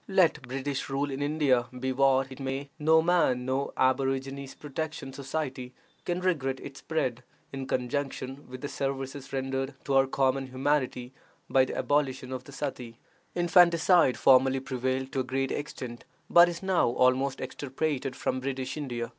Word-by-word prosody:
Let 190 -4 +3
British 135 +2 -4
rule 140 +1 -1
in 135 +1 -4
India 145 -5 +2
be 130 +1 -1
what 135 0 +3
it 130 - -9
may, 135 +1 -4
no 160 +1 +5
man, 165 -8 +2
no 135 +2 -1
"Aborigines 135 +1 0
Protection 150 -2 -5
Society," 130 -3 -4 0.3
can 175 +1 -1
regret 135 -8 0
its 135 -1 -9
spread, 130 -7 -2 0.3
in 135 -1 -5
conjunction 135 +1 -3
with 130 0 -8
the 145 - -3
services 135 0 -4
rendered 135 0 -2
to 140 - -2
our 135 0 +5
common 135 0 +1
humanity 130 -1 -1 0.4
by 130 -1 +5
the - - -5
abolition 135 -3 0
of 130 -1 -5
the - - -11
suttee. 130 -5 -5 0.4
Infanticide 170 -3 +5
formerly 130 0 +5
prevailed 130 0 -2
to 135 - -1
a - - +1
great 135 +1 -1
extent, 125 -5 -5 0.3
but 175 0 +8
is 175 +1 -6
now 190 -2 +3
almost 130 +2 +2
extirpated 135 0 -3
from 130 - -1
British 130 0 -3
India. 120 -6 -3
135 Hz, 155 wpm, -28 LUFS, 130-145 Hz, 0.4 s, but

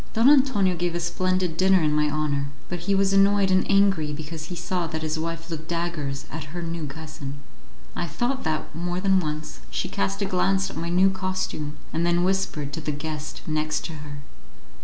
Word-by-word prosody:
Don 230 +3 +5
Antonio 255 -10 +4
gave 175 0 -1
a - - 0
splendid 185 0 0
dinner 190 +1 +5
in 150 -1 +2
my 150 0 +3
honour, 145 -2 0 0.2
but 175 - -3
he 195 +4 +1
was 195 0 +3
annoyed 195 0 +5
and 185 0 +3
angry 195 -6 +4
because 155 +1 -6
he 175 - -6
saw 175 0 -1
that 160 0 -4
his 155 0 -1
wife 165 +1 -4
looked 160 -1 -5
daggers 165 -5 -2
at 160 -1 -5
her 175 - -3
new 165 -2 -3
cousin. 145 -1 -7 0.6
I 175 - -2
thought 245 - -1
that, 155 -1 -2
more 175 +2 -2
than 190 0 +4
once, 155 - -4
she - - -2
cast 100 0 -1
a - - +1
glance 190 +1 +1
at - - -10
my 170 - -3
new 185 +2 +5
costume, 185 -5 -3 0.2
and 165 - +1
then 175 0 +3
whispered 180 -6 0
to 160 - -3
the 150 - -2
guest 150 +1 -5
next 155 0 -1
to 165 - -5
her. 145 -1 -8
170 Hz, 200 wpm, -25 LUFS, 155-185 Hz, 0.6 s, Don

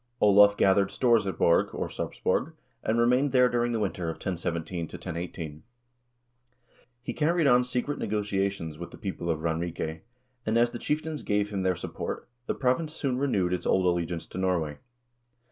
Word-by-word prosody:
Olav 100 0 +6
gathered 100 0 +4
stores 115 -5 +3
at 95 -4 -3
Borg, 85 - +4
or - - -2
Sarpsborg, - - -2 0.3
and 110 - 0
remained 125 +4 +3
there 125 -1 +6
during 120 0 +1
the 115 - 0
winter 95 -4 -2
of 80 - -2
1017 85 -1 -3
1018. 85 -3 -6 1.4
He 120 - -3
carried 165 +3 +2
on 125 -2 +5
secret 125 +3 -2
negotiations 100 -6 -2
with 85 - -6
the - - -12
people 95 -4 -4
in 80 - +1
Ranrike, 80 0 -3 0.4
and 110 +1 +1
as 120 0 +3
the 120 - -6
chieftains 155 0 -2
gave 105 0 0
him 100 -2 -2
their 95 -1 +1
support, 85 - -5 0.2
the - - -1
province 140 +5 0
soon 130 -5 -1
renewed 100 -10 +1
its 90 - -2
old 95 - +3
allegiance 85 -1 0
to 95 - -7
Norway. 85 -6 0
100 Hz, 165 wpm, -28 LUFS, 85-120 Hz, 1.4 s, Olav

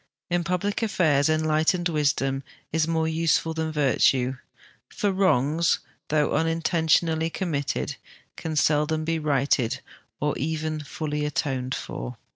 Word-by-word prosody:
In 175 0 +1
public 180 +5 -1
affairs 160 -10 +2
enlight 155 +2 +2
ened 175 - 0
wisdom 140 -4 0 0.3
is 160 0 +2
more 160 -1 +1
useful 160 0 +1
than 160 0 -2
virtue; 135 -3 +2 0.5
for 205 - 0
wrongs, 165 -4 +2 0.3
though 150 -1 +1
unintentionally 165 0 +2
committed, 145 -5 -2 0.4
can 160 -1 -4
seldom 155 +1 +2
be 165 0 0
righted 140 -5 +1 0.4
or 150 0 0
even 155 +1 -2
full}'' 150 0 -3
atoned 135 -3 -2
for. - - -6
155 Hz, 120 wpm, -25 LUFS, 145-165 Hz, 0.5 s, affairs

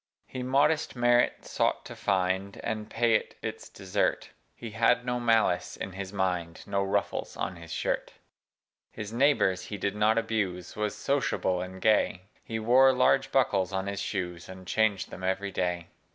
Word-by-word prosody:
He 130 - -6
modest 140 +5 +2
merit 120 0 +2
sought - - 0
to - - -8
find, 95 +1 0
And 110 -1 -3
pay 115 0 +2
it 110 - 0
its - - -5
desert: - - -1 0.2
He 115 -2 -8
had 115 +2 +2
no 125 0 -1
malice 110 -7 +2
in 95 - -5
his 95 0 -6
mind, 90 -4 -2
No 100 -1 0
ruffles 100 0 -2
on 95 - -3
his 85 -1 -11
shirt. - - -2 0.8
His 110 0 -7
neighbors 115 -9 +2
he 105 - -6
did 100 +1 -2
not 105 +1 +3
abuse 100 -6 -2
Was 105 0 -2
sociable 105 -7 0
and 95 +1 -7
gay: 105 -3 +2 0.2
He 110 - -4
wore 125 +4 +5
large 125 - +3
buckles 95 0 +2
on 95 0 -2
his 100 -1 -3
shoes. 90 -4 -4
And 95 0 -10
changed 105 0 +1
them 95 - -9
every 95 +2 -1
day. 90 -2 -2
100 Hz, 165 wpm, -28 LUFS, 95-115 Hz, 0.8 s, wore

